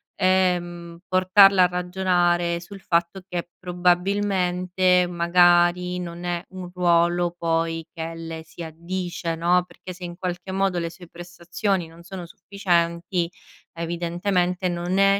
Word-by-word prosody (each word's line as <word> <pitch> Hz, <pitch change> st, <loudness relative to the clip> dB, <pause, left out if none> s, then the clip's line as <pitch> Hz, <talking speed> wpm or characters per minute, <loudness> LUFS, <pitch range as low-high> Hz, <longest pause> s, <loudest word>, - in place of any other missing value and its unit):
ehm, 175 Hz, -2 st, 0 dB
portarla 185 Hz, +1 st, +6 dB
a -, -, +5 dB
ragionare 175 Hz, -1 st, +1 dB
sul 195 Hz, +3 st, -11 dB
fatto 170 Hz, +2 st, 0 dB
che 175 Hz, -2 st, -4 dB
probabilmente 180 Hz, 0 st, +1 dB
magari 175 Hz, +1 st, +3 dB
non 170 Hz, -1 st, -7 dB
è 175 Hz, -1 st, -2 dB
un 185 Hz, -1 st, -8 dB
ruolo 175 Hz, -1 st, +2 dB
poi 165 Hz, -1 st, -1 dB
che 165 Hz, -1 st, -5 dB
le 165 Hz, -1 st, -7 dB
si 165 Hz, -, -12 dB
addice, 170 Hz, +1 st, -4 dB
no, 175 Hz, +2 st, +2 dB
perché 185 Hz, 0 st, -10 dB
se 180 Hz, -, -12 dB
in 175 Hz, 0 st, -8 dB
qualche 180 Hz, 0 st, -4 dB
modo 190 Hz, -1 st, 0 dB
le 165 Hz, -1 st, -3 dB
sue 175 Hz, 0 st, -13 dB
prestazioni 175 Hz, +2 st, -3 dB
non 165 Hz, +1 st, -15 dB
sono 180 Hz, 0 st, -7 dB
sufficienti 170 Hz, -2 st, -1 dB, 0.4 s
evidentemente 175 Hz, +2 st, -1 dB
non 175 Hz, +2 st, -2 dB
è 195 Hz, 0 st, +5 dB
175 Hz, 130 wpm, -24 LUFS, 170-185 Hz, 0.4 s, portarla